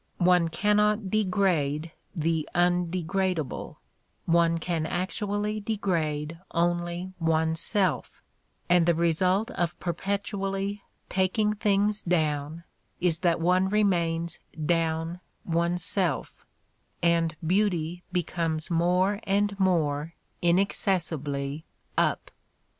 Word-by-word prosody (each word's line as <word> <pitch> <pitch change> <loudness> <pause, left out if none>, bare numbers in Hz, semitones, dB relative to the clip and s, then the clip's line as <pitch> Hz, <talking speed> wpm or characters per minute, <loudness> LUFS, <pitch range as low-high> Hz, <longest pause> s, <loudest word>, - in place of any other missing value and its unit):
One 180 -1 +4
cannot 210 +2 +1
degrade 180 -7 +1 0.2
the 160 -1 0
undegradeable: 175 -1 0 0.5
one 170 0 +3
can 165 -1 -2
actually 205 +4 -2
degrade 165 -7 -2
only 175 +2 -1
oneself, 165 +3 +1 0.4
and 175 -1 +4
the 170 - +4
result 180 +7 +1
of 175 -8 -2
per 175 - -2
petually 195 +1 -2 0.3
"taking 195 +3 +1
things 205 0 +1
down" 155 -2 -1 0.4
is 170 -2 +2
that 170 -2 +2
one 180 +3 +2
remains 170 -5 +1 0.3
"down" 165 +1 0 0.3
oneself, 170 -1 -1 0.6
and 170 -1 +2
beauty 175 -2 +1
becomes 165 -2 -1
more 180 +4 +2
and 200 +1 +1
more 165 -4 +1 0.3
inaccessibly 160 -6 0 0.3
"up." - - 0
175 Hz, 90 wpm, -27 LUFS, 165-195 Hz, 0.6 s, One